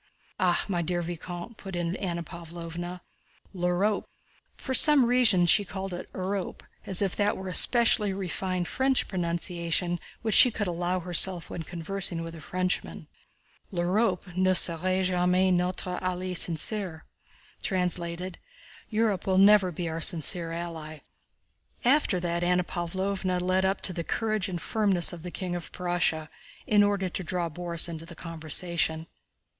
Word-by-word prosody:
"Ah, 180 -2 +2
my 180 -4 -1
dear 175 +1 -1
vicomte," 175 +5 -7
put 195 -2 -7
in 175 0 -1
Anna 170 -3 -3
Pávlovna, 170 +2 -7 0.5
"L'Urope" 180 +3 0 0.5
(for 265 - -4
some 290 -1 +7
reason 235 -7 +4
she 205 +4 +5
called 195 -1 -6
it 175 - -7
Urope 190 0 -3 0.2
as 190 +1 +2
if 195 - 0
that 205 0 +1
were 190 - -6
a 185 - -4
specially 230 -3 +3
refined 185 -1 -2
French 265 0 +1
pronunciation 175 -1 -1 0.2
which 220 -2 0
she 250 - +8
could 210 -2 -2
allow 180 +1 -1
herself 175 0 +3
when 170 - -4
conversing 175 +1 -3
with 165 0 -7
a 165 - -10
Frenchman), 185 +4 -3 0.6
"L'Urope 180 0 0
ne 185 0 +3
sera 185 +2 +2
jamais 180 +1 +2
notre 180 0 -1
alliée 185 0 -2
sincère." 175 0 0 1.9
"Europe 215 -4 0
will 190 -1 +2
never 195 -1 +6
be 170 +1 -4
our 165 0 -4
sincere 165 +1 +1
ally." 165 -2 -6 0.8
After 255 -8 +3
that 170 0 -1
Anna 180 +1 +3
Pávlovna 185 +1 -2
led 185 +1 +1
up 195 +1 0
to 185 - 0
the 170 -1 -3
courage 215 0 -1
and 175 -2 -3
firmness 195 -4 +1
of 170 - -8
the 180 - -6
King 180 0 -4
of 175 - -6
Prussia, 175 -3 -1 0.4
in 210 -1 +4
order 205 -2 +2
to 185 +1 -4
draw 175 0 -2
Borís 170 +1 -1
into 165 -1 -7
the - - -10
conversation. 165 0 -2
180 Hz, 150 wpm, -27 LUFS, 170-195 Hz, 1.9 s, she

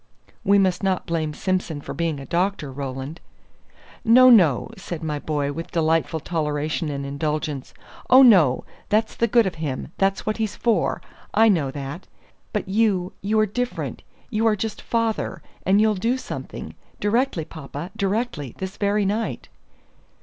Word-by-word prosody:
"We 200 +1 +5
must 185 -2 +2
not 190 -2 0
blame 160 -2 -1
Simson 180 -2 -2
for - - -7
being 165 -3 -1
a 135 - -8
doctor, 175 -4 -1
Roland." 135 +3 -5 0.8
"No, 250 +2 +7
no," 170 - +5
said 175 -5 -6
my 150 -2 -2
boy, 145 -2 -1
with 165 +3 -6
delightful 160 -1 +1
toleration 155 -1 -2
and 140 -1 -4
indulgence; 150 0 -3 0.4
"oh, 260 +1 +9
no; 175 - +6 0.3
that's 220 +1 +2
the 235 - +2
good 235 0 +4
of 190 - -1
him; 140 -4 -3
that's 195 0 +1
what 215 - -1
he's 220 -2 -2
for; 235 -2 0 0.3
I 225 0 +6
know 160 -9 +2
that. 140 +5 -6 0.4
But - - -2
you 195 -3 +1
you 215 +2 +1
are 215 - +5
different; 245 +4 -3 0.3
you 225 0 +2
are 215 - +4
just 215 +1 -4
father; 230 -2 -1 0.2
and 195 +2 +5
you'll 215 0 +4
do 230 +6 0
something 255 - -7 0.3
directly, 210 - +1
papa, 155 +3 -8
directly; 200 - -2
this 190 +1 -6
very 205 0 +1
night." 215 +4 -2
185 Hz, 155 wpm, -23 LUFS, 150-215 Hz, 0.8 s, oh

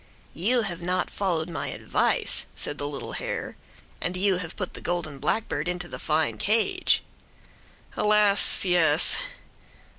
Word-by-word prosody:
"You 230 +9 +2
have 175 -4 -5
not 180 +1 -1
followed 175 -5 -1
my 170 - -4
advice," - - 0
said 145 - -2
the 145 - -2
little 145 -1 -6
hare. - - -4 0.5
"And 180 +1 -1
you 190 0 +2
have 175 -2 -6
put 185 - -5
the - - -9
golden 170 -5 -3
blackbird 170 +2 -2
into 180 -1 -2
the - - -7
fine 155 0 -1
cage." 220 +2 +2 0.9
"Alas! 210 -2 +4
yes!" 165 -3 +5
180 Hz, 140 wpm, -25 LUFS, 160-200 Hz, 0.9 s, yes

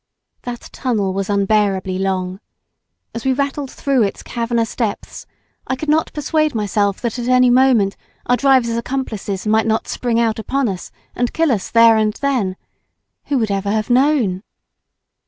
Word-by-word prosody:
That 240 -1 -6
tunnel 210 -7 -1
was 195 +1 -3
unbearably 195 -2 +1
long. 190 -1 -2 0.7
As 230 - -5
we 265 - +2
rattled 280 0 -2
through 275 -2 0
its 200 -2 -1
cavernous 230 -1 -2
depths, 220 -5 -4 0.4
I 260 - 0
could 295 +4 -5
not 315 +1 +2
persuade 310 -1 0
myself 205 -2 0
that 235 0 -3
at 240 - -3
any 250 0 +5
moment 245 -6 +4 0.3
our 245 - +3
driver's 255 -3 +3
accomplices 225 -6 -4
might 220 +1 +2
not 220 0 0
spring 235 -2 -1
out 225 -1 +1
upon 270 +4 -1
us 185 -2 -6 0.3
and 245 0 -1
kill 325 -3 +2
us 205 -6 -1
there 230 -1 +6
and 215 -1 +1
then. 245 -10 -1 0.7
Who 285 - 0
would 220 -4 0
ever 200 0 -1
have 215 +3 -1
known? 250 -8 +2
230 Hz, 160 wpm, -18 LUFS, 200-260 Hz, 0.7 s, there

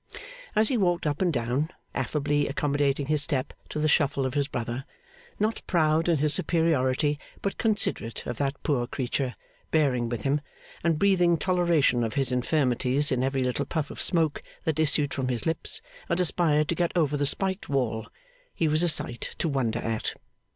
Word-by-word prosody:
As 215 0 +4
he 255 - +1
walked 175 -5 +1
up 145 +2 -1
and 180 -2 +3
down, 130 +3 -1 0.2
affably 145 -1 0
accommodating 140 0 0
his 150 0 +1
step 140 -3 -1 0.2
to - - -5
the 155 0 +2
shuffle 140 -3 +2
of 130 - -2
his 145 -1 +1
brother, 120 -1 -4 0.6
not 215 +2 0
proud 160 -1 +2
in 165 - +3
his 150 +1 +2
superiority, 150 -3 +2 0.2
but 200 - -2
considerate 205 - 0
of 120 - -5
that 140 0 0
poor 125 -6 0
creature, 125 0 -2 0.3
bearing 130 -7 +2
with 115 -3 -4
him, 145 +2 +1 0.4
and 165 -2 +2
breathing 180 -2 +3
toleration 170 -9 +2
of 115 +2 -3
his 135 -2 +2
infirmities 130 +1 +1
in 130 -1 +1
every 135 0 0
little 125 +3 -1
puff 150 0 -3
of - - -6
smoke 160 -4 +2 0.2
that 160 -1 -1
issued 145 -2 +2
from 130 -1 -2
his 125 -2 -2
lips 160 -1 -2 0.3
and 170 - +1
aspired 155 -3 +3
to - - +2
get 170 0 0
over 150 -3 +2
the 145 -1 +1
spiked 190 +5 0
wall, 115 -5 -1 0.5
he 165 - +1
was 155 +1 +3
a 175 - +4
sight 120 -6 -1
to - - -1
wonder 130 -6 0
at. 115 -2 -2
145 Hz, 180 wpm, -27 LUFS, 130-165 Hz, 0.6 s, As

